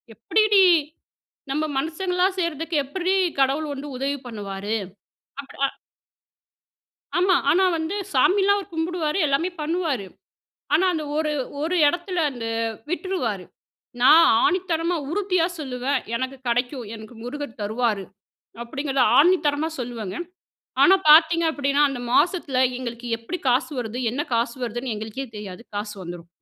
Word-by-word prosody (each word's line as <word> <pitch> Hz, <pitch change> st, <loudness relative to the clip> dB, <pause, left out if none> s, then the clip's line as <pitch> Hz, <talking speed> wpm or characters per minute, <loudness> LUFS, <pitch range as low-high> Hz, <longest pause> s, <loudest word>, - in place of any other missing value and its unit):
"எப்படிடீ? 415 Hz, -, +4 dB, 0.9 s
நம்ம 305 Hz, +3 st, 0 dB
மனுஷங்களா 360 Hz, +5 st, 0 dB
செய்றதுக்கு, 330 Hz, -1 st, -2 dB
எப்படிறீ 370 Hz, +5 st, -1 dB, 0.3 s
கடவுள் 285 Hz, +3 st, +1 dB
வந்து 280 Hz, +2 st, -7 dB
உதவி 275 Hz, +2 st, -2 dB
பண்ணுவாரு?" 205 Hz, -2 st, -4 dB, 0.7 s
அப் 275 Hz, -, -16 dB
அ -, -, +3 dB, 1.5 s
ஆமா. 370 Hz, 0 st, +4 dB, 0.2 s
ஆனா 365 Hz, +5 st, +4 dB
வந்து, 320 Hz, +5 st, -3 dB, 0.2 s
சாமில்லாம் 400 Hz, +1 st, +4 dB
அவர் 395 Hz, -1 st, -10 dB
கும்பிடுவாரு 325 Hz, 0 st, -1 dB
எல்லாமே 290 Hz, +6 st, +1 dB
பண்ணுவாரு. 305 Hz, -, -1 dB, 0.7 s
ஆனா 355 Hz, +5 st, +4 dB
அந்த 310 Hz, -2 st, -3 dB
ஒரு 305 Hz, -1 st, 0 dB, 0.3 s
ஒரு 330 Hz, +4 st, -1 dB
இடத்தில 350 Hz, +3 st, -2 dB
அந்த, 240 Hz, -3 st, -6 dB, 0.4 s
விட்டுருவாரு. 340 Hz, -, -2 dB, 0.6 s
நான் 320 Hz, +6 st, +8 dB, 0.2 s
ஆணித்தனமா 355 Hz, -2 st, 0 dB
உறுதியா 365 Hz, -3 st, +1 dB
சொல்லுவேன், 260 Hz, -1 st, -2 dB, 0.2 s
"எனக்கு 260 Hz, +2 st, -3 dB
கடைக்கும். 245 Hz, +1 st, -1 dB
எனக்கு 220 Hz, +2 st, -11 dB
முருகர் 285 Hz, -1 st, -6 dB
தருவாரு." 215 Hz, -2 st, -1 dB, 0.6 s
அப்படிங்கிறத 270 Hz, +1 st, 0 dB, 0.2 s
ஆணித்தனமா 315 Hz, -3 st, +2 dB
சொல்லுவேங்க. 230 Hz, -, -5 dB, 0.7 s
ஆனா 380 Hz, +1 st, +7 dB
பார்த்தீங்க 325 Hz, +2 st, +7 dB
அப்படின்னா, 280 Hz, -1 st, +1 dB
அந்த 270 Hz, -3 st, -5 dB
மாசத்துல 300 Hz, -5 st, +2 dB, 0.2 s
எங்களுக்கு 240 Hz, -1 st, -6 dB
எப்டி 330 Hz, +11 st, -5 dB
காசு 260 Hz, +6 st, +1 dB
வருது, 240 Hz, +1 st, -4 dB
என்ன 280 Hz, +4 st, -2 dB
காசு 235 Hz, +1 st, 0 dB
வருதுன்னு 240 Hz, +1 st, -3 dB
எங்களுக்கே 220 Hz, +5 st, -5 dB
தெரியாது, 200 Hz, +1 st, -8 dB
காசு 205 Hz, 0 st, -4 dB
வந்துரும். 175 Hz, -1 st, -8 dB
285 Hz, 125 wpm, -23 LUFS, 240-340 Hz, 1.5 s, நான்